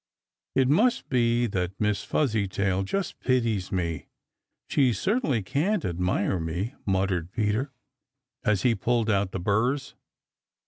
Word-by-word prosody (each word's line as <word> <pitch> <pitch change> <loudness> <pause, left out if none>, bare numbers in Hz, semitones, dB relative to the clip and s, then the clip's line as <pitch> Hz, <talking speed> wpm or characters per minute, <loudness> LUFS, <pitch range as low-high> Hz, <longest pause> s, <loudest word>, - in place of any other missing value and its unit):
"It 130 -1 +4
must 225 - +2
be 120 -2 +2
that 95 -3 -3
Miss 105 -1 0
Fuzzytail 100 -7 0
just 190 - -3
pities 115 -7 0
me. 85 -4 -2 0.6
She 130 -4 +3
certainly 150 - 0
can't 165 - 0
admire 90 +2 0
me," 85 - -3
muttered 95 -3 0
Peter, 110 +5 0 0.7
as 105 -3 +1
he 125 - +4
pulled 115 -1 +1
out 100 -2 +1
the 95 - -3
burrs. 120 +9 0
105 Hz, 125 wpm, -26 LUFS, 95-130 Hz, 0.7 s, It